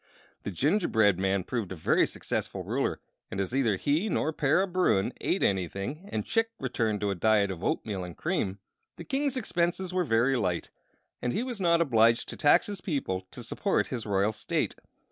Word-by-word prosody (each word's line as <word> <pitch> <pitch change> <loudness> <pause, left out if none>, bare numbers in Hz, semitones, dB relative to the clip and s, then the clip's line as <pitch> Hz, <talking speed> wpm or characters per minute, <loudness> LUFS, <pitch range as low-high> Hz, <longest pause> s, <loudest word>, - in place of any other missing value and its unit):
The - - -4
gingerbread 110 - +2
man 95 0 +1
proved 115 -5 -3
a - - -4
very 80 - +2
successful - - -4
ruler; - - -1 0.3
and 95 - -5
as 100 +4 -2
neither 125 -6 +2
he 155 - +1
nor 160 -3 0
Para 150 +6 +2
Bruin 180 - +1
ate - - 0
anything 100 - -2
and 105 - -2
Chick 225 0 +1
returned 115 -5 -1
to 100 -1 +1
a - - +1
diet 100 +1 +2
of 90 -1 -7
oatmeal 100 -4 -1
and 90 -2 -8
cream, 155 - -1 0.4
the - - -8
King's 270 - -1
expenses 180 -4 -1
were 185 -1 +2
very 125 -1 +2
light, 90 -8 -1 0.5
and 125 - -1
he 235 - 0
was 245 -5 -5
not 170 -2 +4
obliged 115 -6 +3
to - - -6
tax 145 - +4
his 200 -3 -6
people 95 - -2
to - - -9
support - - 0
his 115 -4 -4
royal 100 +1 +2
state. 105 - -2
120 Hz, 185 wpm, -28 LUFS, -, 0.5 s, not